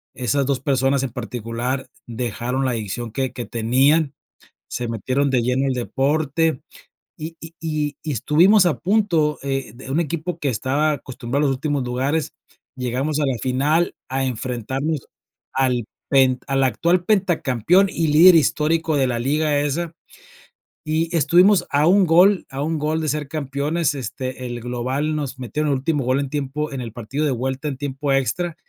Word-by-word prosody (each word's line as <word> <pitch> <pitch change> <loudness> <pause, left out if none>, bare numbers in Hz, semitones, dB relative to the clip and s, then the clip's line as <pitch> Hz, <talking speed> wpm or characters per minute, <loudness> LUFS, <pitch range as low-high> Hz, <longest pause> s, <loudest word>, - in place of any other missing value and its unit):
esas 135 +2 0
2 135 -2 -1
personas 135 0 +1
en 130 - -3
particular 120 +2 -4 0.2
dejaron 120 +2 -3
la 130 - +1
adicción 115 +1 -4
que 130 0 -2
que 120 - -5
tenían, 135 +6 +2 0.6
se 120 0 -3
metieron 130 +5 0
de 125 - +2
lleno 125 +3 +1
el 135 - +1
deporte. 145 +4 0 0.6
Y 160 +2 -6
y 165 0 -11
y 155 -3 -2
y 155 - -3
estuvimos 175 - +4
a 160 - 0
punto, 175 -8 +1
eh 135 -5 -3
de 130 +2 -11
un 145 +5 +1
equipo 170 +2 -3
que 145 -4 -1
estaba 140 +6 +1
acostumbrado 135 +1 -3
a - - +3
los 135 - +1
últimos 145 -1 -1
lugares, 135 +6 -1 0.4
llegamos 130 +4 -1
a 145 - +2
la 130 -3 0
final, 145 +6 +1
a 135 +1 -1
enfrentarnos 130 +4 -3 0.4
al 125 -4 +1 0.2
pent 130 -2 +3
al 135 0 +1
actual 170 +7 +2
pentacampeón 180 - +2
y 165 -3 -1
líder 165 +4 +7
histórico 160 +1 +2
de 135 -2 +2
la 120 -1 -1
liga 145 +3 +1
esa. 160 +3 -2 0.9
Y 160 +2 -1
estuvimos 175 +4 +4
a 145 +2 +2
un 190 +1 +5
gol, 180 +4 +5
a 135 +1 -5
un 160 0 -1
gol 155 +2 0
de 155 - -1
ser 150 -1 -2
campeones, 150 +2 -1
este, 130 -1 -5
el 120 -1 -5
global 130 +6 -2
nos 135 -3 -4
metieron 145 +5 -2
el - - +1
último 145 -2 -1
gol 130 +2 +2
en 140 - -4
tiempo 150 +1 -3
en 135 - -4
el 115 -3 -6
partido 130 +6 -3
de 145 - +1
vuelta 130 +4 -2
en 140 - -2
tiempo 140 0 -2
extra, 155 +6 0
140 Hz, 170 wpm, -21 LUFS, 130-155 Hz, 0.9 s, líder